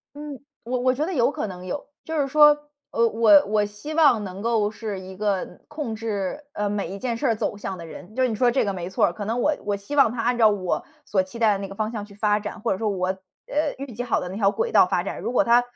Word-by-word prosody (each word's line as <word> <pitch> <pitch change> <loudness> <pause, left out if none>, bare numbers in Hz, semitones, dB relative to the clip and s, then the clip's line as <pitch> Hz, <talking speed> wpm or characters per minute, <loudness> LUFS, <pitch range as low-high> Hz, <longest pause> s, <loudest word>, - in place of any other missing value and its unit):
嗯， 290 -2 -7 0.2
我 250 +1 -1
我 255 0 +3
觉 300 +5 -1
得 375 - -3
有 240 -4 +3
可 - - -3
能 180 -2 -8
有， 285 +10 -4 0.2
就 320 -1 -3
是 275 - +2
说， 295 +2 +7 0.4
呃， 230 0 +3
我 215 -3 +6
我 210 0 +2
希 210 +10 -7
望 275 -10 +5
能 190 +1 -7
够 225 -3 +2
是 215 -2 -5
一 185 0 -10
个 195 -3 -2
控 300 -7 -4
制， 215 +4 -3
呃， 205 0 -1
每 205 -1 -2
一 195 - -6
件 235 +2 -2
事 250 - -1
儿 225 - +3
走 205 - -2
向 195 -2 -5
的 165 - -8
人， 180 +5 -11
就 260 - +2
是 255 - +3
你 220 - -2
说 245 +3 +3
这 240 - +2
个 200 - -1
没 180 -1 -5
错 - - +2
儿。 175 - -1
可 205 +3 -6
能 230 +4 -1
我 300 - +2
我 205 -1 0
希 200 +8 -7
望 275 -5 +5
它 235 0 -4
按 245 +1 +1
照 225 -2 +6
我 190 -4 -1 0.2
所 195 -7 +1
期 185 +5 -10
待 220 -3 +4
的 195 - -1
那 195 -1 -5
个 195 - -10
方 215 +2 -2
向 210 -3 -4
去 205 - -15
发 210 0 +1
展。 210 +1 -6
或 - - 0
者 190 - -2
说 220 - 0
我 185 -3 -1
呃， 190 +11 -3
预 275 -2 -6
计 240 +3 -4
好 245 - +1
的 180 - -5
那 185 - -7
条 200 -2 +3
轨 465 - -2
道 - - +7
发 - - 0
展， - - -5
如 - - -3
果 - - +3
它 240 +1 +5
215 Hz, 310 characters per minute, -24 LUFS, 200-245 Hz, 0.4 s, 说